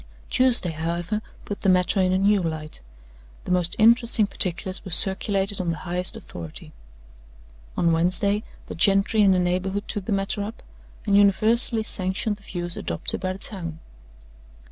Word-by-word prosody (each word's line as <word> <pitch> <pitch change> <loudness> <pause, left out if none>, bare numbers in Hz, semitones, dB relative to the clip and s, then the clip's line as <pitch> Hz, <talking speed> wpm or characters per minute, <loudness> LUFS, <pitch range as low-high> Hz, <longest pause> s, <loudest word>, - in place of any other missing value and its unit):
"Tuesday, 250 -9 +3
however, 170 +6 -3 0.2
put 205 - -6
the 195 - +2
matter 185 +1 +3
in 185 0 +2
a 185 - +2
new 200 +1 +3
light. 155 - -3 0.6
The - - -4
most 180 -2 +1
interesting 230 0 +4
particulars 185 -1 -2
were 195 - -8
circulated 195 +2 +2
on 175 - -2
the 165 - -2
highest 180 +1 0
authority. 80 -3 -10 1.0
On 170 -1 +3
Wednesday, 185 +5 +1 0.2
the - - -7
gentry 195 +4 +3
in 200 -2 +5
the 185 - +3
neighborhood 185 +3 -1
took 205 -3 -4
the - - -4
matter 195 +1 -1
up, 210 +3 -7 0.4
and 200 -2 +2
universally 220 +3 +3
sanctioned 200 +1 -2
the - - -21
view 175 -3 -5
adopted 85 - -2
by 185 -1 -2
the - - -9
town. 175 -6 -7
190 Hz, 160 wpm, -24 LUFS, 175-205 Hz, 1.0 s, in